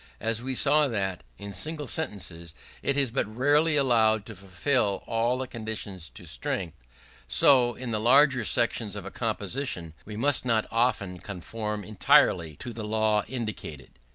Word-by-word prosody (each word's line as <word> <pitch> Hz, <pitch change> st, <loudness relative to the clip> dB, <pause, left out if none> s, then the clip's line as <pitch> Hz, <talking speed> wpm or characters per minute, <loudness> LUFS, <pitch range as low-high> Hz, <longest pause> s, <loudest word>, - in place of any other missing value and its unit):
As 115 Hz, +1 st, -1 dB
we 130 Hz, +1 st, -3 dB
saw 150 Hz, +3 st, +4 dB
that, 95 Hz, -6 st, -3 dB
in 100 Hz, 0 st, -8 dB
single 155 Hz, +6 st, -3 dB
sentences, 90 Hz, -, -4 dB, 0.3 s
it 140 Hz, -, 0 dB
is 135 Hz, -4 st, +1 dB
but 125 Hz, -, 0 dB
rarely 145 Hz, +8 st, +2 dB
allowable 110 Hz, -6 st, +3 dB
to 115 Hz, -, -9 dB
fulfill 100 Hz, +3 st, -1 dB
all 120 Hz, +2 st, 0 dB
the 130 Hz, -, -3 dB
conditions 110 Hz, -7 st, -6 dB
to -, -, -9 dB
strength; 90 Hz, -4 st, -4 dB, 0.5 s
so, 120 Hz, -, +5 dB
in 125 Hz, -2 st, -6 dB
the 110 Hz, -, 0 dB
larger 130 Hz, +2 st, +5 dB
sections 115 Hz, -2 st, +1 dB
of 100 Hz, -2 st, -7 dB
a -, -, -7 dB
composition 105 Hz, -, -3 dB
we 105 Hz, 0 st, -8 dB
must 140 Hz, +3 st, +1 dB
not 115 Hz, -3 st, +1 dB
often 110 Hz, -6 st, 0 dB
conform 105 Hz, +3 st, -5 dB
entirely 105 Hz, -, +3 dB
to 120 Hz, +10 st, -7 dB
the 110 Hz, -1 st, -6 dB
law 110 Hz, -1 st, +1 dB
indicated. 110 Hz, -, -6 dB
110 Hz, 155 wpm, -27 LUFS, 100-130 Hz, 0.5 s, so